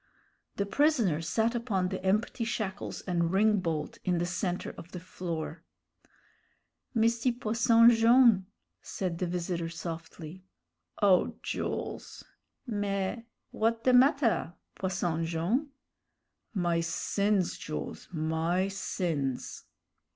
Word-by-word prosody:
The 200 Hz, -, -1 dB
prisoner 230 Hz, -, +2 dB
sat 225 Hz, +8 st, +1 dB
upon 210 Hz, -7 st, -1 dB
the -, -, -5 dB
empty 210 Hz, +5 st, 0 dB
shackles 215 Hz, -4 st, -3 dB
and 170 Hz, -2 st, 0 dB
ring 210 Hz, +2 st, +4 dB
bolt 160 Hz, -4 st, -3 dB
in 180 Hz, -1 st, +1 dB
the 170 Hz, -, 0 dB
centre 180 Hz, 0 st, -2 dB
of 170 Hz, -, -12 dB
the 180 Hz, -, -5 dB
floor. 170 Hz, -2 st, -5 dB, 1.3 s
"Misty 230 Hz, +2 st, +2 dB
Posson 230 Hz, 0 st, +5 dB
Jone'," 230 Hz, -4 st, +5 dB, 0.3 s
said 180 Hz, -3 st, -4 dB
the 180 Hz, -, 0 dB
visitor, 170 Hz, -1 st, -2 dB
softly. 165 Hz, +1 st, -7 dB, 0.6 s
"O 190 Hz, -3 st, +4 dB
Jools!" -, -, -4 dB, 0.4 s
"Mais, 205 Hz, -2 st, -2 dB, 0.3 s
w'at 225 Hz, +1 st, 0 dB
de 255 Hz, -, +4 dB
matter, 250 Hz, -, +3 dB, 0.2 s
Posson 175 Hz, -3 st, -1 dB
Jone'?" 175 Hz, -, 0 dB, 0.8 s
"My 175 Hz, -5 st, 0 dB
sins, 195 Hz, +3 st, 0 dB
Jools, 155 Hz, -, -6 dB
my 165 Hz, +3 st, 0 dB
sins!" 165 Hz, -9 st, -3 dB
190 Hz, 105 wpm, -29 LUFS, 170-225 Hz, 1.3 s, Posson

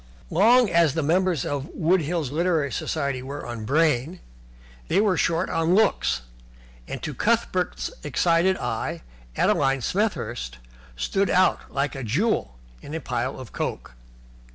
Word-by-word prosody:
Long 230 Hz, +7 st, +5 dB
as 170 Hz, -6 st, +3 dB
the 160 Hz, -, 0 dB
members 175 Hz, -1 st, +1 dB
of 145 Hz, 0 st, -3 dB
Wood 175 Hz, +2 st, +2 dB
Hills 155 Hz, -3 st, -2 dB
Literary 160 Hz, -3 st, +1 dB
Society 140 Hz, -5 st, -2 dB
were 140 Hz, +3 st, -6 dB
on 120 Hz, -2 st, -6 dB
brain, 155 Hz, +3 st, +1 dB, 0.7 s
they 185 Hz, -, +2 dB
were 205 Hz, -3 st, +3 dB
short 170 Hz, +2 st, +1 dB
on 165 Hz, +2 st, +1 dB
looks, 195 Hz, -, +2 dB, 0.6 s
and, -, -, -6 dB
to -, -, -3 dB
Cuthbert's 60 Hz, 0 st, 0 dB
excited 175 Hz, -, +2 dB
eye, -, -, -3 dB, 0.3 s
Adeline 135 Hz, -1 st, +2 dB
Smethurst 120 Hz, -, -2 dB, 0.4 s
stood 195 Hz, -, 0 dB
out 185 Hz, +1 st, +2 dB
like 140 Hz, +1 st, -1 dB
a 135 Hz, -2 st, -6 dB
jewel 115 Hz, -, 0 dB, 0.2 s
in 150 Hz, -, -7 dB
a -, -, -2 dB
pile 125 Hz, -1 st, -3 dB
of 130 Hz, -4 st, -9 dB
coke. -, -, -4 dB
155 Hz, 140 wpm, -24 LUFS, 130-180 Hz, 0.7 s, Long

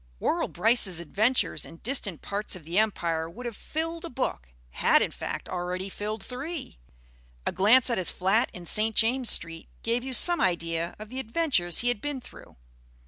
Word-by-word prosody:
Worrall -, -, 0 dB
Brice's 195 Hz, -2 st, +2 dB
adventures 205 Hz, -, +1 dB
in 165 Hz, -, -10 dB
distant 205 Hz, -, -1 dB
parts 205 Hz, 0 st, 0 dB
of 180 Hz, -, -10 dB
the 170 Hz, +6 st, +1 dB
empire 170 Hz, -7 st, 0 dB
would 245 Hz, +9 st, -9 dB
have 235 Hz, -3 st, -4 dB
filled 330 Hz, +6 st, -4 dB
a 340 Hz, -, -5 dB
book -, -, -3 dB, 0.2 s
had, -, -, +4 dB
in -, -, 0 dB
fact, -, -, -5 dB
already 180 Hz, +2 st, -3 dB
filled 210 Hz, +1 st, -5 dB
three. 275 Hz, -, -6 dB, 0.7 s
A -, -, 0 dB
glance 220 Hz, +8 st, +5 dB
at 235 Hz, -, +1 dB
his 185 Hz, -, +1 dB
flat 195 Hz, +6 st, +1 dB
in 175 Hz, -1 st, -8 dB
St. 215 Hz, +5 st, +2 dB
James' 245 Hz, +2 st, +3 dB
Street 165 Hz, -1 st, 0 dB
gave 235 Hz, +2 st, 0 dB
you 265 Hz, 0 st, -4 dB
some 345 Hz, +5 st, +6 dB
idea 170 Hz, -1 st, 0 dB
of 215 Hz, 0 st, -10 dB
the 260 Hz, +2 st, -5 dB
adventures 230 Hz, -, +1 dB
he 245 Hz, -, +2 dB
had 245 Hz, -4 st, -1 dB
been 290 Hz, -2 st, -3 dB
through. -, -, -13 dB
215 Hz, 185 wpm, -27 LUFS, 175-250 Hz, 0.7 s, some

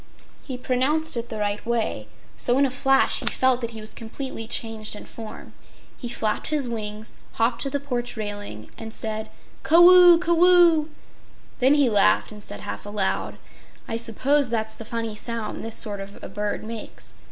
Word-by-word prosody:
He 260 Hz, -3 st, -6 dB
pronounced 265 Hz, +6 st, 0 dB
it 235 Hz, 0 st, -4 dB
the 220 Hz, -, -5 dB
right 205 Hz, 0 st, -2 dB
way, 230 Hz, -, -2 dB, 0.3 s
so 245 Hz, +1 st, +1 dB
in 280 Hz, -, +4 dB
a 265 Hz, -, -1 dB
flash 270 Hz, +1 st, +2 dB
he -, -, -5 dB
felt 260 Hz, -1 st, +3 dB
that 235 Hz, -, -3 dB
he 225 Hz, -2 st, -8 dB
was 215 Hz, -, -7 dB
completely 225 Hz, 0 st, -6 dB
changed 220 Hz, -2 st, -2 dB
in -, -, -10 dB
form. 220 Hz, -2 st, -10 dB, 0.4 s
He 240 Hz, -, -7 dB
flapped 215 Hz, -2 st, -1 dB
his 295 Hz, -4 st, 0 dB
wings, 215 Hz, -2 st, -4 dB, 0.2 s
hopped 235 Hz, +1 st, 0 dB
to 275 Hz, -, -1 dB
the 285 Hz, +1 st, -2 dB
porch 245 Hz, -4 st, -4 dB
railing 205 Hz, -, -5 dB
and 225 Hz, 0 st, -7 dB
said: 220 Hz, 0 st, -4 dB, 0.3 s
"Caw 325 Hz, -, +3 dB
oo! 360 Hz, -1 st, +8 dB
Caw 345 Hz, 0 st, -1 dB
oo!" 345 Hz, -4 st, +5 dB, 0.7 s
Then 265 Hz, +3 st, +5 dB
he 285 Hz, -3 st, +4 dB
laughed 210 Hz, -2 st, +3 dB
and 210 Hz, -1 st, -11 dB
said 105 Hz, -, -7 dB
half 100 Hz, +1 st, -6 dB
aloud: 205 Hz, -2 st, -2 dB, 0.5 s
"I -, -, -3 dB
suppose 250 Hz, +5 st, +1 dB
that's 220 Hz, -1 st, -2 dB
the 225 Hz, -, -10 dB
funny 230 Hz, -1 st, -4 dB
sound 225 Hz, 0 st, -5 dB
this 225 Hz, 0 st, -1 dB
sort 205 Hz, -2 st, +4 dB
of 195 Hz, +1 st, -9 dB
a -, -, -7 dB
bird 205 Hz, +2 st, -3 dB
makes. 220 Hz, 0 st, -9 dB
230 Hz, 185 wpm, -24 LUFS, 215-270 Hz, 0.7 s, oo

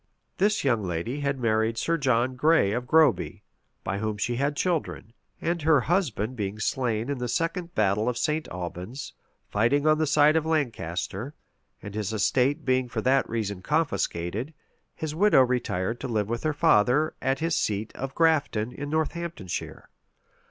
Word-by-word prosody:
This 205 Hz, +1 st, +2 dB
young 120 Hz, -6 st, +2 dB
lady 90 Hz, -, -3 dB
had 140 Hz, -1 st, -1 dB
married 110 Hz, -1 st, +1 dB
Sir 165 Hz, +7 st, +1 dB
John 130 Hz, -4 st, +1 dB
Gray 150 Hz, -6 st, +3 dB
of 125 Hz, +3 st, -3 dB
Groby, 155 Hz, -4 st, +3 dB, 0.4 s
by 100 Hz, -, -2 dB
whom 110 Hz, -1 st, -2 dB
she 120 Hz, +3 st, -1 dB
had 140 Hz, +2 st, 0 dB
children; 160 Hz, -9 st, -2 dB, 0.3 s
and 170 Hz, 0 st, -1 dB
her 155 Hz, -3 st, +4 dB
husband 130 Hz, -, 0 dB
being 105 Hz, -2 st, -3 dB
slain 115 Hz, 0 st, -1 dB
in 140 Hz, -2 st, -3 dB
the 125 Hz, -, -2 dB
second 170 Hz, +7 st, -2 dB
battle 105 Hz, +2 st, +2 dB
of 120 Hz, -, -3 dB
St. 155 Hz, +5 st, -1 dB
Albans, 90 Hz, +8 st, -6 dB, 0.4 s
fighting 125 Hz, +8 st, +2 dB
on 155 Hz, 0 st, +4 dB
the 155 Hz, -, +1 dB
side 145 Hz, +2 st, +5 dB
of 160 Hz, -, +2 dB
Lancaster, 125 Hz, -, -2 dB, 0.5 s
and 100 Hz, 0 st, -7 dB
his 105 Hz, -1 st, -2 dB
estate 130 Hz, +8 st, +1 dB
being 130 Hz, -1 st, +1 dB
for 115 Hz, -, -3 dB
that 135 Hz, +3 st, +2 dB
reason 105 Hz, -4 st, -3 dB
confiscated, 115 Hz, -, -1 dB, 0.4 s
his 155 Hz, -1 st, -4 dB
widow 180 Hz, -5 st, +5 dB
retired 120 Hz, -3 st, -1 dB
to 135 Hz, -, -4 dB
live 110 Hz, -4 st, -1 dB
with 115 Hz, 0 st, -2 dB
her 155 Hz, -, 0 dB
father, 140 Hz, +4 st, +3 dB
at 135 Hz, +1 st, +1 dB
his 165 Hz, +2 st, 0 dB
seat 105 Hz, +1 st, -1 dB
of 135 Hz, 0 st, -5 dB
Grafton, 150 Hz, -9 st, +2 dB
in 145 Hz, +2 st, -6 dB
Northamptonshire. 160 Hz, -, -3 dB
130 Hz, 165 wpm, -26 LUFS, 110-155 Hz, 0.5 s, side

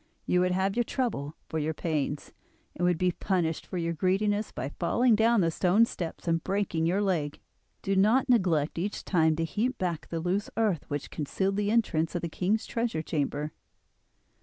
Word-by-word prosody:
You 180 Hz, -, +2 dB
would 180 Hz, 0 st, +2 dB
have 190 Hz, +2 st, +1 dB
your 240 Hz, -, +2 dB
trouble 185 Hz, -, -2 dB
for 160 Hz, -, -2 dB
your 155 Hz, +1 st, -1 dB
pains, 150 Hz, -3 st, -2 dB, 0.4 s
and 175 Hz, -, -3 dB
would 175 Hz, -2 st, +2 dB
be 180 Hz, +1 st, +2 dB
punished 170 Hz, -3 st, -1 dB
for 185 Hz, -, -4 dB
your 170 Hz, -1 st, -1 dB
greediness 205 Hz, +5 st, 0 dB
by 135 Hz, -, -4 dB
falling 240 Hz, +7 st, +3 dB
down 225 Hz, 0 st, +4 dB
the 165 Hz, -2 st, +2 dB
stone 190 Hz, +7 st, +4 dB
steps 175 Hz, -6 st, -6 dB
and 165 Hz, -1 st, +1 dB
breaking 190 Hz, -5 st, 0 dB
your 195 Hz, +4 st, +1 dB
leg. 160 Hz, -7 st, -1 dB, 0.4 s
Do 195 Hz, -, 0 dB
not 220 Hz, +8 st, +4 dB
neglect 175 Hz, -, +2 dB
each 200 Hz, +4 st, -3 dB
time 160 Hz, -4 st, +3 dB
to 165 Hz, +1 st, -1 dB
heap 230 Hz, +9 st, -1 dB
back 175 Hz, -4 st, -2 dB
the 165 Hz, -, -3 dB
loose 185 Hz, +5 st, -1 dB
earth 210 Hz, -8 st, +1 dB
which 145 Hz, -1 st, -4 dB
concealed 190 Hz, +6 st, -1 dB
the 205 Hz, 0 st, +1 dB
entrance 180 Hz, -8 st, +1 dB
of 175 Hz, -, -2 dB
the 170 Hz, -, -2 dB
king's 195 Hz, +7 st, 0 dB
treasure 230 Hz, -9 st, -2 dB
chamber. 150 Hz, -1 st, -2 dB
180 Hz, 185 wpm, -28 LUFS, 160-205 Hz, 0.4 s, down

